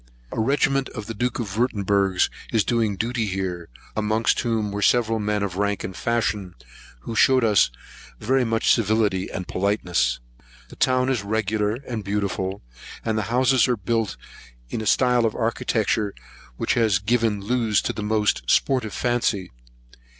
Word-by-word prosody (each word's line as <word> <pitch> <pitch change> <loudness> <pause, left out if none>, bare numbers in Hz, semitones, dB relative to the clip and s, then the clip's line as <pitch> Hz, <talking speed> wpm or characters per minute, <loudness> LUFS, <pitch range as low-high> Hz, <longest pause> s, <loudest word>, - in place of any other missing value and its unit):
A - - -4
regiment 135 +2 +1
of 105 -3 -7
the 115 - -5
Duke 120 +3 -2
of 105 -2 -4
Wirtemburg 100 -5 +1 0.3
is 110 -2 +3
doing 115 -2 0
duty 115 +2 -1
here, 90 -3 -3 0.3
amongst 110 +1 +1
whom 110 -3 -1
were 100 +1 -3
several 115 -1 +3
men 105 -1 -1
of 95 -2 -3
rank 100 0 0
and 95 - -5
fashion, 105 -6 -1 0.5
who 115 - -6
shewed 130 +2 +4
us 105 -3 +4 0.5
much 115 -1 +2
civility 105 -4 +1
and 90 -2 -5
politeness. 95 - 0 0.5
The - - -12
town 130 0 +2
is 130 -5 0
regular 105 0 0
and 115 -4 -4
beautiful, 100 -1 -2 0.4
and 110 -1 0
the 110 - +1
houses 130 +1 +3
are 125 -2 +1
built 110 0 -1 0.5
in - - -2
a 110 - -4
style 125 0 +3
of 110 -2 0
architecture, 110 -2 0 0.4
which - - 0
has 110 -5 +3
given 110 +1 +1
loose 110 0 +1
to - - -1
the - - -5
most 105 0 +1
sportive 125 -6 +2
fancy. 115 -6 0
110 Hz, 155 wpm, -23 LUFS, 100-120 Hz, 0.5 s, shewed